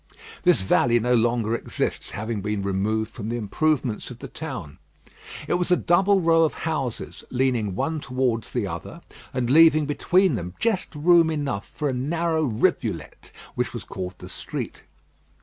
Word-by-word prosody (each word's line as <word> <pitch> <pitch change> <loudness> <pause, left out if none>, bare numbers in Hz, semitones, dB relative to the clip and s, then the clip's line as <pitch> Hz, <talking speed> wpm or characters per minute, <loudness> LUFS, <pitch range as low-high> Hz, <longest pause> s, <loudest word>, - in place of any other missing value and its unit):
This 175 - +2
alley 120 0 +4
no 125 +2 +1
longer 115 -1 +2
exists, 115 - -2
having 110 0 -4
been 105 0 -2
removed 105 +3 -1
for 120 - -10
the 110 +3 -3
improvements 125 +2 0
of 125 - -9
the 135 - -8
town. 125 - -7 0.7
It - - 0
was 175 +1 +1
a 180 - +5
double 190 +3 +3
row 165 -1 +4
of 160 - +1
houses, 140 -7 -3
leaning 125 -6 0
one 160 +9 -1
towards 125 -6 -1
the - - -1
other, - - -7 0.3
and 125 -2 -1
leaving 155 +2 +6
between 180 +5 +2
them 90 -5 -4
just 205 -7 -1
room 165 +2 +5
enough 140 -10 -3
for 150 - -1
a 135 - 0
narrow 160 +5 0
rivulet, 115 -5 -1 0.2
which - - -2
was - - -5
called 90 -1 -6
the - - -10
street. - - -6
130 Hz, 165 wpm, -24 LUFS, 110-160 Hz, 0.7 s, leaving